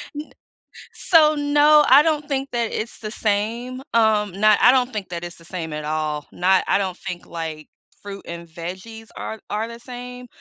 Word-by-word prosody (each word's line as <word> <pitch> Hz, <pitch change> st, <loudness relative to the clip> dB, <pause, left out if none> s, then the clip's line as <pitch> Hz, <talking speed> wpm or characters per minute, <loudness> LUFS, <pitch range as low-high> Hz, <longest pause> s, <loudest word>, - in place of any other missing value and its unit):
N 300 Hz, +1 st, -7 dB, 0.6 s
So, 310 Hz, -3 st, +4 dB
no, 295 Hz, +1 st, +5 dB
I 275 Hz, +3 st, +9 dB
don't 300 Hz, -2 st, 0 dB
think 275 Hz, -1 st, -2 dB
that 235 Hz, -2 st, -1 dB
it's 225 Hz, +2 st, -5 dB
the 215 Hz, -1 st, -6 dB
same, 230 Hz, +5 st, -2 dB
um, 215 Hz, -3 st, +3 dB
not 215 Hz, -1 st, +5 dB
I 245 Hz, -, +8 dB
don't 255 Hz, -1 st, +2 dB
think 210 Hz, -4 st, -5 dB
that 170 Hz, -1 st, -5 dB
it's 175 Hz, 0 st, -8 dB
the 165 Hz, -, -18 dB
same 165 Hz, -3 st, -6 dB
at 150 Hz, 0 st, -5 dB
all. 150 Hz, -1 st, -2 dB
Not 185 Hz, +1 st, +2 dB
I -, -, +3 dB
don't 190 Hz, -2 st, -2 dB
think, 180 Hz, -2 st, -7 dB
like, 160 Hz, -2 st, -6 dB, 0.3 s
fruit 200 Hz, -1 st, -8 dB
and 170 Hz, 0 st, -7 dB
veggies 185 Hz, +7 st, -8 dB
are 220 Hz, -, -6 dB
are 220 Hz, +2 st, -2 dB
the 235 Hz, 0 st, -10 dB
same, 250 Hz, 0 st, -9 dB
215 Hz, 190 wpm, -22 LUFS, 175-250 Hz, 0.6 s, I